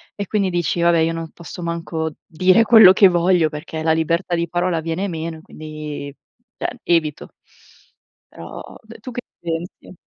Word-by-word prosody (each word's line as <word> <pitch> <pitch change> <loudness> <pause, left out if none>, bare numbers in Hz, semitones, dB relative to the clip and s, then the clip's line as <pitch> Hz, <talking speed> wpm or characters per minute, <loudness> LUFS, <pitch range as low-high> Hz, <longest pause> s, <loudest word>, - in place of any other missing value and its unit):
E 200 - -4
quindi 200 -3 0
dici: 175 -1 -1
"Va 170 - +5
beh, 165 -1 +3
io 165 +1 0
non 165 -1 -6
posso 175 +1 -10
manco 165 -1 -3
dire 185 +6 +3
quello 220 -4 +8
che 195 0 +7
voglio 175 -2 +3
perché 155 +1 -6
la 160 - +2
libertà 165 +3 0
di 170 0 -1
parola 175 -1 0
viene 165 +5 -2
meno 160 -1 -5
e - - -15
quindi" 155 -2 -8 0.4
cioè 245 - -4
evito. 160 -4 0 1.0
Però - - -10 0.4
d 225 0 -13
tu 250 +3 -8
che 245 - -5 0.2
pensi? 170 +2 -6
170 Hz, 175 wpm, -20 LUFS, 160-185 Hz, 1.0 s, quello